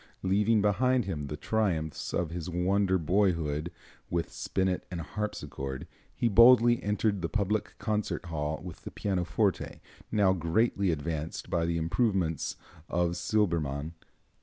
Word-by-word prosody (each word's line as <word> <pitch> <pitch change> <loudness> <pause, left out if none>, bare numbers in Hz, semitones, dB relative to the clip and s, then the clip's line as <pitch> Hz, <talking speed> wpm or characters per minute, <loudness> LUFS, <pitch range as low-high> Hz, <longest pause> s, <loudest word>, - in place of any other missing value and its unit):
Leaving 105 +3 +3
behind 125 +3 +2
him 75 -7 -3
the 75 +1 -5
triumphs 85 -7 -1
of 85 -2 -1
his 85 0 -4
wonder 95 +2 +2
boyhood 85 -3 +1 0.4
with 85 -1 -1
spinet 95 -1 -1
and 90 -3 -4
harpsichord, 70 -9 -5 0.3
he 120 - +1
boldly 120 +2 +7
entered 105 -1 0
the 85 - -2
public 105 0 -1
concert 105 -4 -2
hall 75 -2 -3
with 90 -3 -9
the - - -7
pianoforte, 95 -4 -1 0.3
now 100 -3 +4
greatly 95 +4 +1
advanced 80 0 -3
by 85 -1 +1
the 85 0 0
improvements 85 - 0 0.3
of 85 0 +1
Silbermann. 80 -9 0
90 Hz, 130 wpm, -29 LUFS, 80-105 Hz, 0.4 s, boldly